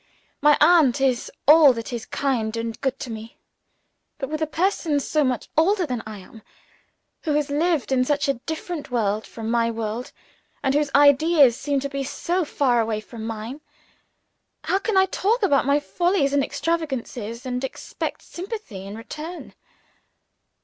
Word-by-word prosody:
My 295 -1 +5
aunt 305 -5 +5
is 260 -3 0 0.2
all 300 -2 +8
that 230 +1 -6
is 235 -2 -5
kind 230 -5 -1
and 230 -1 -4
good 265 -1 -1
to 240 - -5
me; 220 +1 -8 0.8
but 270 -3 -4
with 310 +1 -3
a 315 - +1
person 325 -2 0
so 300 +2 0
much 255 -4 -1
older 365 +4 +3
than 250 -6 -3
I 215 -1 -7
am 200 +3 -14 0.8
who 310 - -1
has 295 -1 0
lived 315 -1 +1
in 255 -1 +3
such 285 +1 0
a 275 - +3 0.2
different 320 -1 -5
world 215 -3 -1
from 225 0 -5
my 230 -1 +2
world, 225 +2 -4 0.5
and 270 -1 +2
whose 295 0 +1
ideas 285 -2 +6
seem 285 +2 -1
to 280 - -2
be 275 0 -3
so 345 +6 -1
far 255 -6 +1
away 220 -1 -1
from 220 +1 -8
mine 225 +6 -6 1.0
how 385 - +1
can 415 0 -1
I 380 - +6
talk 430 +5 0
about 280 -8 +3
my 285 +1 +4
follies 345 -2 0
and 285 -1 +3
extravagances, 260 -9 -3
and 250 0 -3
expect 265 - -5
sympathy 350 - -7
in 205 +2 -7
return! 310 +9 -8
275 Hz, 165 wpm, -23 LUFS, 235-315 Hz, 1.0 s, all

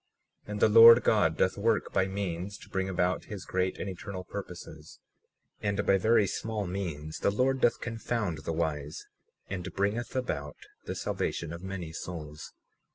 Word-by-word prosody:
37:7 - - -7
And 105 - -3
the - - +6
Lord 115 +2 +10
God 80 -7 +3
doth 95 +1 +2
work 110 +1 +1
by 95 - +2
means 95 0 -4
to - - -15
bring 95 0 -1
about 90 0 0
his 100 -4 -7
great 95 0 -1
and - - -4
eternal 95 0 -6
purposes; 85 -6 -9 0.6
and 100 0 -1
by 95 - +4
very 110 +1 +4
small 110 +1 -3
means 85 -5 -4
the - - +2
Lord 130 +5 +1
doth 120 - +3
confound 115 -7 -2
the 75 - -4
wise 80 -2 -3 0.4
and 95 -1 -5
bringeth 105 +6 -1
about 75 - -3 0.3
the - - -4
salvation 85 -1 -2
of 85 - -7
many 95 -4 -5
souls. 80 -3 -7
95 Hz, 165 wpm, -29 LUFS, 85-105 Hz, 0.6 s, Lord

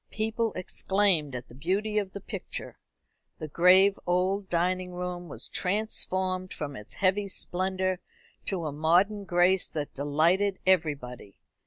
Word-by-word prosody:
People 220 +1 -1
exclaimed 185 -5 +1
at 125 0 -6
the - - -15
beauty 195 - 0
of 195 -2 -5
the 200 - -5
picture. - - -7 0.6
The 155 - -6
grave 185 +5 +5
old 185 +2 +1
dining 180 +1 0
room 180 -1 -5
was 125 -2 -5
transformed 185 -2 0
from 145 -2 -5
its 105 -3 -11
heavy 200 +1 +1
splendour 185 0 -1 0.5
to 180 -4 -2
a 150 - -2
modern 180 +8 +2
grace 180 +1 +3
that 150 -2 -5
delighted 165 +8 +1
everybody. 145 - 0
185 Hz, 135 wpm, -28 LUFS, 160-195 Hz, 0.6 s, grave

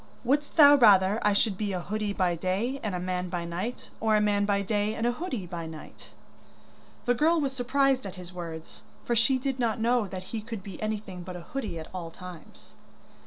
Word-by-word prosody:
'Wouldst 285 +4 0
thou 290 -3 +9
rather 205 -6 +6
I 210 - +3
should 200 -1 +1
be 205 -2 -1
a 180 - -1
hoodie 210 +3 -2
by 185 -3 +1
day 195 +10 -1
and 205 -4 -2
a - - -2
man 180 0 -2
by 175 -1 -3
night, 180 +9 -5
or 220 -1 +3
a - - +5
man 205 -1 +2
by 200 -1 +1
day 210 +1 0
and 225 - -2
a 240 - +3
hoodie 250 - -4
by 170 -2 -5
night?' 160 -1 -11 1.0
The 245 - +4
girl 320 +7 +3
was 275 -3 -1
surprised 265 -1 +1
at 190 - -8
his 180 -1 -10
words, 165 -2 -7 0.2
for 235 - +1
she 235 +4 +3
did 265 0 -3
not 230 -2 0
know 235 -1 +2
that 185 -1 -6
he 225 - -2
could 220 -2 -7
be 195 -3 -9
anything 210 -4 -4
but 180 +1 -7
a 175 - -7
hoodie 215 -2 -5
at 160 - -7
all 175 -3 -5
times. 180 -1 -12
210 Hz, 215 wpm, -28 LUFS, 180-240 Hz, 1.0 s, thou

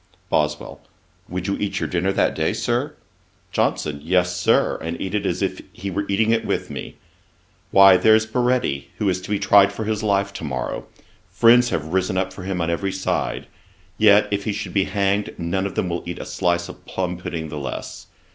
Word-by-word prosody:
BOSWELL. 75 0 -1 0.5
'Would 90 +1 -4
you 100 - 0
eat 100 -1 -2
your - - -1
dinner 90 +2 0
that - - +1
day, - - 0
Sir?' - - -1 0.6
JOHNSON. 75 -2 -1
'Yes, 90 +2 +1
Sir; 90 - +2
and 80 +1 -4
eat 95 0 -4
it 105 - 0
as - - -1
if - - -2
he 100 0 -5
were 100 +3 -2
eating 110 +3 +2
it 115 0 +2
with - - -2
me. - - -7 0.7
Why, 95 -1 +7
there's 110 +4 +5
Baretti, 120 - 0
who 105 - -1
is 95 0 -1
to 90 - -10
be 105 - +1
tried 100 0 +5
for 105 +2 -5
his 105 0 -1
life 100 -2 +1
to - - -7
morrow, 65 -4 -4 0.4
friends 120 +1 +5
have 80 -5 -3
risen 95 0 +1
up 95 0 -1
for - - -9
him 90 -1 -3
on 85 0 0
every 95 +3 -1
side; 95 0 -2 0.5
yet 105 -1 +6
if 100 -1 -1
he 105 - -1
should 100 - -5
be 95 -2 +2
hanged, 100 0 0
none 90 +3 -1
of 100 - -9
them - - 0
will 85 0 -2
eat 90 0 -4
a - - -6
slice 85 -1 0
of - - -12
plumb 90 -1 -3
pudding 80 -3 -5
the 75 -1 -5
less. 65 -4 -6
95 Hz, 205 wpm, -22 LUFS, 85-100 Hz, 0.7 s, Why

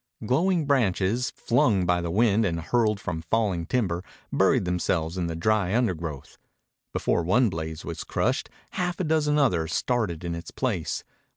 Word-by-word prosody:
Glowing 165 - +2
branches, 120 -3 +1
flung 110 -6 +2
by 90 0 +2
the 85 - -3
wind 110 +3 +3
and 85 -5 0
hurled 105 +4 +1
from 90 -5 -4
falling 90 -2 0
timber, 90 -8 0 0.3
buried - - +3
themselves 90 -2 -1
in 90 -2 -1
the 85 - -3
dry 100 +2 +1
undergrowth. 85 - -2 0.5
Before - - +1
one 105 +8 +3
blaze 80 -1 -5
was 85 -2 -5
crushed - - -1 0.2
half 180 -2 -2
a - - 0
dozen 150 -2 +2
others 85 - +1
started 105 -10 -1
in 85 -1 -3
its 85 -1 -6
place. 105 - -2
95 Hz, 160 wpm, -26 LUFS, 85-120 Hz, 0.5 s, wind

